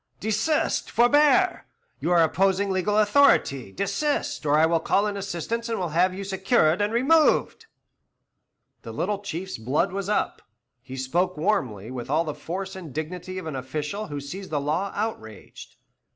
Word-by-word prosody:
"Desist 220 +9 0
forbear! 295 +9 +3 0.3
You - - -2
are 175 -2 +5
opposing 195 +4 +1
legal 190 +3 0
authority; 205 - +3
desist, 200 - -2
or 145 +1 +4
I 155 - +5
will 165 0 +2
call 200 +5 +1
in 205 -1 -2
assistance 200 +5 -4
and 225 - -1
will 180 -3 -2
have 175 +4 +2
you 190 +2 -6
secured 190 -2 +2
and 205 +1 +1
removed." 310 - +2 1.1
The - - -9
little 205 -2 -2
Chief's 190 - -6
blood 135 - 0
was 195 0 -3
up; 210 - -1 0.4
he 130 +1 -9
spoke 175 +7 -1
warmly, 130 - -1
with 125 -1 -6
all 155 +4 +2
the 155 -2 -4
force 190 +5 -6
and 175 -6 -8
dignity 180 +5 -5
of 185 - -6
an 155 -3 -5
official 150 +10 -4
who 145 -1 -5
sees 185 +8 -8
the 150 - -1
law 160 +8 -1
outraged. 110 - -6
185 Hz, 165 wpm, -25 LUFS, 155-210 Hz, 1.1 s, are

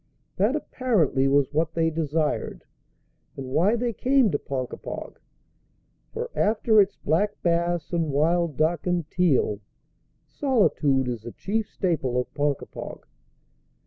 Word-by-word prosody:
That, - - +2
apparently, 165 - +1
was 140 +1 +2
what 160 +1 0
they 165 -1 +2
desired, 155 -1 -2 0.7
and 135 - -5
why 185 - +3
they 235 0 -1
came 255 -1 +3
to 145 - 0
Ponkapog. 130 -2 -6 0.9
For 475 +1 -5
after 215 0 +3
its 195 0 0
black 200 +7 0
bass 170 -1 0
and 165 -2 0
wild 160 +1 +1
duck 160 +2 +1
and 175 -3 0
teal, 145 - +2 0.7
solitude 155 - +1
is 120 -3 -3
the 120 +1 -8
chief 215 - -2
staple 135 - -1
of 125 - -4
Ponkapog. 145 -1 -3
165 Hz, 125 wpm, -25 LUFS, 145-205 Hz, 0.9 s, why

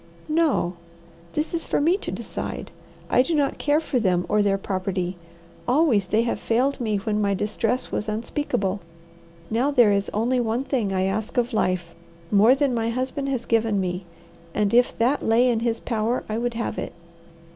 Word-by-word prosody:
"No. 305 - +1 0.6
This 305 +3 -2
is 335 - +1
for - - 0
me 325 +5 +3
to - - -6
decide. - - -5 0.4
I - - +4
do 320 +6 0
not 285 -2 0
care 295 +1 +2
for 290 -5 -1
them 180 -5 +1
or 210 - +2
their 200 -1 +2
property. 185 -2 -2 0.5
Always 245 - +3
they 215 +5 +2
have 235 - -1
failed 260 +4 +1
me 215 -3 0
when 210 +1 -1
my 200 -1 +1
distress 220 +5 -1
was 215 - -2
unspeakable. 215 -3 -1 0.7
Now 240 +5 +2
there 245 -7 +5
is 200 0 +1
only 240 +4 +1
one 235 +2 0
thing 240 -8 -1
I 185 -1 +1
ask 205 +5 -2
of 245 0 +1
life, 180 -5 0 0.4
more 215 +5 +6
than 275 -2 +1
my 230 -1 0
husband 260 +3 -2
has 250 -3 -2
given 225 -3 +2
me, 180 0 -2 0.5
and 210 0 +1
if 245 +1 +4
that 250 +5 +2
lay 230 +3 +3
in 235 -2 +2
his 230 0 -1
power 230 +1 -1
I 215 - -3
would 240 +1 -2
have 230 - -3
it. - - -5
230 Hz, 185 wpm, -24 LUFS, 205-255 Hz, 0.7 s, more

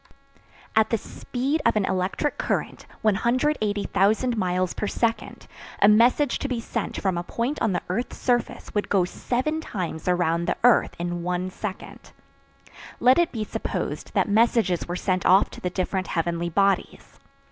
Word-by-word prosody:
At 220 0 +4
the 230 - +1
speed 270 +8 -3
of 230 - +3
an 210 -2 +2
electric 190 +11 -1
current, - - -2 0.2
180,000 220 -1 +1
miles 185 -3 0
per 210 - -3
second, 230 +2 -2 0.3
a - - +6
message 240 +7 +4
to - - -2
be 250 -3 -2
sent 230 - -4
from 185 -3 0
a - - -4
point 240 +10 -3
on 220 - +2
the - - -2
earth's 220 +8 -3
surface 245 -2 -1
would 205 - -1
go 190 -3 +3
seven 260 - -2
times 180 - -5
around 170 -1 +1
the - - 0
earth 245 -1 +4
in 175 0 -3
one 180 +1 -2
second. 195 0 -8 0.9
Let 255 +5 +5
it 345 - +2
be 220 -3 -3
supposed - - -4
that - - +2
messages 215 -4 +2
were 175 - -3
sent 185 -1 -1
off 190 +2 +4
to - - -11
the 180 - -1
different 185 +1 -2
heavenly 170 0 -1
bodies. 195 +3 0
205 Hz, 160 wpm, -24 LUFS, 180-240 Hz, 0.9 s, a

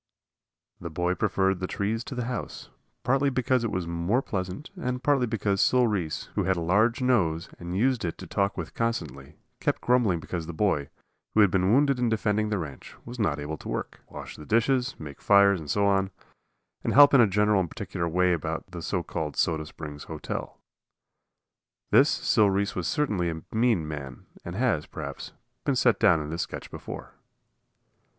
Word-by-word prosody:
The 85 - -6
boy 90 +3 0
preferred 95 -1 +1
the 90 - -2
trees 110 +5 -2
to 135 - -6
the 125 -1 -2
house, 125 0 -5 0.3
partly 135 +3 +2
because 130 -1 +1
it 115 - 0
was 90 -3 -2
more 85 +10 0
pleasant 95 - -4
and 125 -8 -3
partly 140 -4 +3
because 100 -3 0
Sil 125 -1 +4
Reese, 95 -9 -1
who - - 0
had 95 +1 +2
a - - -2
large 110 +9 +2
nose 90 -10 +1
and 85 +1 -4
used 125 +2 +2
it 85 -2 -3
to - - -9
talk 100 0 -1
with 85 -3 -5
constantly, 75 - -3 0.2
kept - - 0
grumbling 120 -8 +2
because 80 0 -5
the 85 - -5
boy, 80 -8 +1 0.5
who 110 - +6
had 100 -3 +5
been 95 +1 +2
wounded 140 +1 +3
in 120 -1 +2
defending 105 -1 0
the 105 - 0
ranch, 75 -7 -7
was 120 +1 -8
not 80 -9 +1
able 75 +2 -4
to - - -9
work - - -4
wash - - -8
the 75 - -10
dishes, 125 +3 +1
make 75 -3 -9
fires 100 -2 +5
and 75 -2 -9
so 100 +5 +2
on, 95 -1 +2 0.7
and - - 0
help 145 +1 +8
in 135 - +8
a 115 - +6
general 105 +1 +3
and 90 -3 -1
particular 85 +2 -4
way 90 +2 +3
about 80 +2 -4
the 85 -2 -6
so 90 +1 -2
called 75 -2 -4
"Soda 80 -2 0
Spring 75 -2 -8
Hotel." - - -6 1.3
This - - +6
Sil 105 -2 +3
Reese 100 +1 0
was 90 - -3
certainly 105 - 0
a 80 -1 -5
mean 110 -9 +2
man, 70 -4 -7 0.2
as 85 - -6
has, 115 -10 +1
perhaps, - - -7 0.3
been 140 - +1
set 120 -2 +3
down 90 -6 +5
in 75 0 -6
this 85 - -2
sketch - - -6
before. - - -8
100 Hz, 190 wpm, -27 LUFS, 85-120 Hz, 1.3 s, help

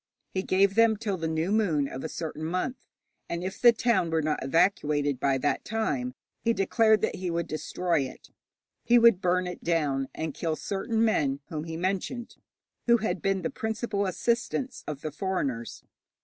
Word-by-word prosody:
He 190 - 0
gave 195 +1 +3
them 225 0 +4
till 205 -2 -2
the 165 -2 -3
new 160 +3 -1
moon 175 -10 +2
of 130 - -7
a 160 - -3
certain 155 -1 -5
month, 185 +10 -3 0.4
and 170 +1 -3
if 190 +1 -5
the 240 - +9
town 230 -6 +1
were 160 -1 +1
not 150 -2 -1
evacuated 145 -3 +2
by 135 -1 +2
that 145 +2 0
time 140 - -2 0.3
he 230 - +3
declared 220 +1 +3
that - - -1
he 185 -1 -3
would 170 0 -1
destroy 170 +2 -1
it. - - -15 0.5
He 240 +1 +5
would 230 -5 +6
burn 180 +1 +2
it 180 - -6
down, 145 -5 +1
and 160 -2 -3
kill 160 +1 -2
certain 220 +6 -1
men 140 -10 +1
whom 155 -1 -4
he 165 -1 -5
mentioned, 195 +7 -2 0.5
who 235 0 +6
had 220 0 -2
been 195 -1 0
the 245 - -1
principal 220 -4 -2
assistants 235 +5 -1
of 150 -2 -5
the 155 - -4
foreigners. 145 - -3
180 Hz, 180 wpm, -28 LUFS, 155-220 Hz, 0.5 s, the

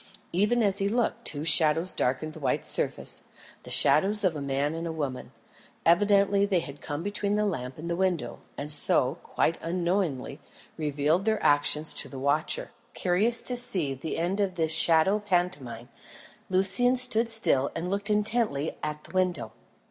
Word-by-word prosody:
Even 210 +6 +1
as 200 -1 +2
he 200 0 0
looked, 235 +1 -2
two 145 0 -5
shadows 160 +2 +4
darkened 135 +5 -2
the - - -11
white - - -1
surface - - +1 0.4
the - - -12
shadows 205 +6 +3
of 180 -4 +1
a 150 - -5
man 140 +2 -2
and 165 +1 -5
a - - -4
woman. 145 -5 -5 0.5
Evidently 200 +3 +3
they 200 -3 +1
had 145 -3 -9
come 145 +2 -5
between 205 0 0
the 210 0 0
lamp 130 -10 -4
and 160 +2 -8
the 170 - -2
window, 185 -2 -2 0.2
and 145 +1 -4
so, 135 -3 +3
quite 165 - -1
unknowingly, 170 -5 -2 0.4
revealed 150 +4 -1
their 220 -1 +1
actions 150 +1 +2
to - - -1
the 135 - -9
watcher. 150 - -2 0.2
Curious 210 +6 +1
to 250 - +1
see 185 - -1
the 135 +5 -6
end 175 +5 -2
of 195 -3 -1
this 160 -2 +1
shadow 165 +6 +3
pantomime, 175 - -3 0.6
Lucian 195 +7 +3
stood 245 -2 +3
still 140 -12 +2
and 165 +2 -4
looked 200 +2 -2
intently 210 -8 -1
at 150 0 -5
the 155 - -14
window. 180 -12 -1
175 Hz, 170 wpm, -26 LUFS, 150-200 Hz, 0.6 s, shadows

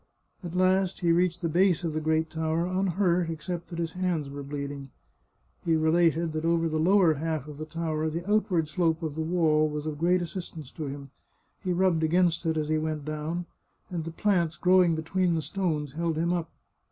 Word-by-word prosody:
At 175 0 -6
last 185 +1 +2
he 170 -1 +3
reached 175 0 +2
the - - +2
base 175 +1 +3
of 165 -2 -2
the 155 - -2
great 160 +1 0
tower, 160 +1 0
unhurt, 180 -2 +1
except 165 +2 -5
that 170 - -7
his 165 -1 -2
hands 175 -6 -1
were 140 0 -6
bleeding. 140 -1 -6 0.7
He 165 -1 +2
related 165 +1 +2
that 155 0 -3
over 165 0 +2
the 155 -1 -1
lower 180 0 +5
half 155 -1 -3
of 150 -1 -9
the 155 - -5
tower 160 -1 -2
the 170 +3 -5
outward 195 -6 +2
slope 165 +1 0
of 155 -2 -2
the 160 - -3
wall 160 -2 +2
was 150 0 -4
of 150 -2 -4
great 175 +2 +2
assistance 165 -5 -7
to 155 -3 -5
him. 140 -1 -7 0.5
He 185 - -1
rubbed 175 -2 +2
against 170 +1 +2
it 160 0 +1
as 155 -1 -1
he 155 0 +2
went 155 -2 -3
down, 155 +3 -3 0.5
and 170 -3 -2
the 165 - -5
plants 170 -2 0
growing 180 -2 +4
between 170 +2 0
the 160 - 0
stones 155 -7 -2
held 165 +1 -2
him 170 +2 +1
up. 170 -2 -2
165 Hz, 200 wpm, -27 LUFS, 155-175 Hz, 0.7 s, lower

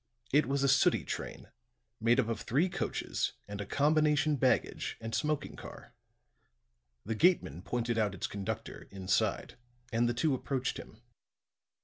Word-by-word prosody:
It 150 +2 +4
was 140 0 0
a - - +4
sooty 135 0 +4
train, - - -6 0.5
made 115 +3 +3
up 120 - +2
of 115 -3 -2
three 150 +10 +1
coaches - - -2
and 100 0 -5
a 100 - -6
combination 150 +2 +3
baggage 130 -3 +1
and 115 0 -6
smoking 150 -1 -1
car. - - -11 1.1
The 110 - -1
gateman 110 - +2
pointed 120 +2 -1
out 105 -3 +1
its - - -3
conductor, 100 -1 -5
inside, 95 -1 -1 0.4
and 120 +1 +3
the 120 - -1
two 150 +3 +2
approached 130 0 -2
him. 110 - -11
125 Hz, 145 wpm, -32 LUFS, 110-145 Hz, 1.1 s, It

